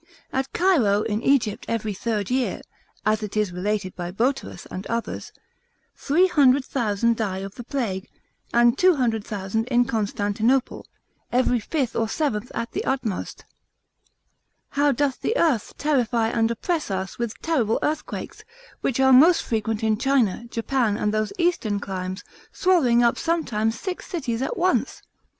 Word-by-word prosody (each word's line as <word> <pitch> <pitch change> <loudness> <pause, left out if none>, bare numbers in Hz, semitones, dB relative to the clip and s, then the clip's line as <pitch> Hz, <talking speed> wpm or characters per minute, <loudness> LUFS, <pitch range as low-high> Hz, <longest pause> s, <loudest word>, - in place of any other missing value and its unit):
At 265 0 -1
Cairo 245 - +3
in 210 +1 -1
Egypt, 240 -5 +1
every 220 -2 -2
third 210 +1 -2
year, 255 0 0 0.4
(as 215 0 +2
it 210 0 -5
is 210 -3 +1
related 185 +1 -2
by 175 -1 -4
Boterus, 245 +9 -2
and 190 +2 -6
others) 230 0 -4 0.6
300,000 265 - +2
die 205 -4 -2
of 195 +1 -6
the 240 - -8
plague; 225 -7 -3 0.4
and 240 0 +4
200,000, 225 - +1
in 245 -1 +3
Constantinople, 220 +3 0 0.4
every 250 0 +2
fifth 260 +2 -2
or 225 -1 0
seventh 245 -7 -2
at 230 - -3
the - - -3
utmost. 255 -8 -3 1.2
How 285 0 +2
doth 275 0 -1
the 470 - 0
earth 280 -11 +1
terrify 240 -6 +1
and 225 -1 +1
oppress 310 +7 -2
us 190 +2 -4
with 235 -2 -3
terrible 250 -10 +1
earthquakes, 310 +1 -3 0.4
which 265 - -1
are 265 0 +5
most 320 +7 +6
frequent 220 -1 -2
in 215 -1 +1
China, 245 -6 +1
Japan, 230 -2 0
and 210 0 0
those 215 -1 0
eastern 330 - +1
climes, 185 -1 -5 0.3
swallowing 270 -11 +3
up 235 - +2
sometimes 230 -10 0
six 370 -2 -5
cities 260 -9 -3
at 265 - -2
once? 370 +1 0
235 Hz, 140 wpm, -24 LUFS, 210-270 Hz, 1.2 s, most